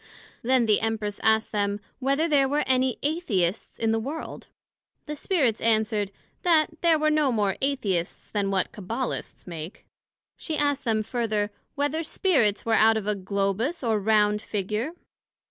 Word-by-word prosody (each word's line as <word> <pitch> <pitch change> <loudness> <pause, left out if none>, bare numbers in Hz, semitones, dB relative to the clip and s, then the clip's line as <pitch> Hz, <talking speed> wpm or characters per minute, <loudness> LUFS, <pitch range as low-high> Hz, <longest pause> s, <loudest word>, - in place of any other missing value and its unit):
Then 250 0 +3
the 215 -2 +3
Empress 220 -2 -2
asked 220 0 +2
them, 205 -1 0 0.2
Whether 275 +5 +1
there 280 -4 +3
were 295 +2 +1
any 260 -1 +2
Atheists 225 - -1
in 225 -1 +1
the 225 - +1
World? 285 +8 -6 0.6
The 300 - -5
Spirits 280 - +1
answered, 215 -2 +1 0.3
That 320 -2 +2
there 335 -2 +4
were 310 0 +2
no 300 -3 +3
more 205 -4 +1
Atheists 205 -11 -1
then 200 -2 -1
what 195 -1 0
Cabbalists 230 +5 -4
make. 170 +3 -8 0.5
she 315 -3 -4
asked 285 -1 0
them 220 -2 +1
further, 215 -2 -1 0.2
Whether 290 +3 0
Spirits 270 - +1
were 225 -1 +3
of 220 -1 +4
a 210 - +1
globous 200 - -1
or 220 -2 +2
round 210 0 +3
Figure? 215 - -3
225 Hz, 150 wpm, -26 LUFS, 210-285 Hz, 0.6 s, there